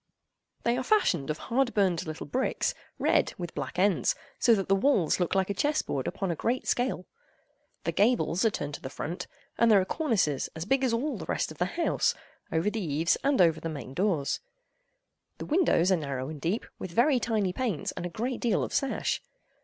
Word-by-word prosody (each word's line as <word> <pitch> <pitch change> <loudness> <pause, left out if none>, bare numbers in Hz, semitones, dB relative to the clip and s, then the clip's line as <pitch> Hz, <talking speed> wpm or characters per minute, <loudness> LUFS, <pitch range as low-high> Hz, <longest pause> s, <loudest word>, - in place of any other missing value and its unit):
They 235 - +2
are 260 - -1
fashioned 185 - +2
of 155 - -1
hard 245 +5 0
burned 185 -6 +2
little 155 0 -5
bricks, 260 +1 0 0.2
red, - - +2
with 175 -2 -5
black 140 +1 -5
ends, 190 -2 +3 0.2
so 235 -2 +5
that 195 -2 -2
the 195 - +3
walls 195 - +3
look 180 +1 0
like 190 +1 +2
a - - 0
chess 295 +9 +1
board 135 -2 -3
upon 195 -3 -2
a - - -1
great 240 +9 -1
scale. 245 -7 0 0.8
The - - 0
gables 205 -5 +2
are 225 - +5
turned 145 -7 -4
to - - -6
the 130 - -6
front, 175 +6 -5 0.3
and 235 - +5
there 210 -3 +7
are 185 - +1
cornices, 195 - 0
as 160 +1 -4
big 270 +5 +2
as 255 - +2
all 245 0 -1
the - - -6
rest - - -1
of 155 - -12
the 180 - +2
house, 340 - +2 0.4
over 165 +6 +1
the 225 - -3
eaves 160 +2 +1
and 280 0 +2
over 165 -3 +5
the 165 - -4
main 140 -4 -7
doors. 175 -5 0 1.0
The - - -6
windows 295 - +3
are 185 - +4
narrow 140 -3 -4
and 155 -2 -8
deep, 185 +7 -1
with 185 - -5
very 250 - +3
tiny 215 -6 0
panes 220 - -2
and - - -6
a 175 - -3
great 240 +7 -3
deal 230 -5 +2
of - - -4
sash. 275 - 0
195 Hz, 210 wpm, -28 LUFS, 165-240 Hz, 1.0 s, there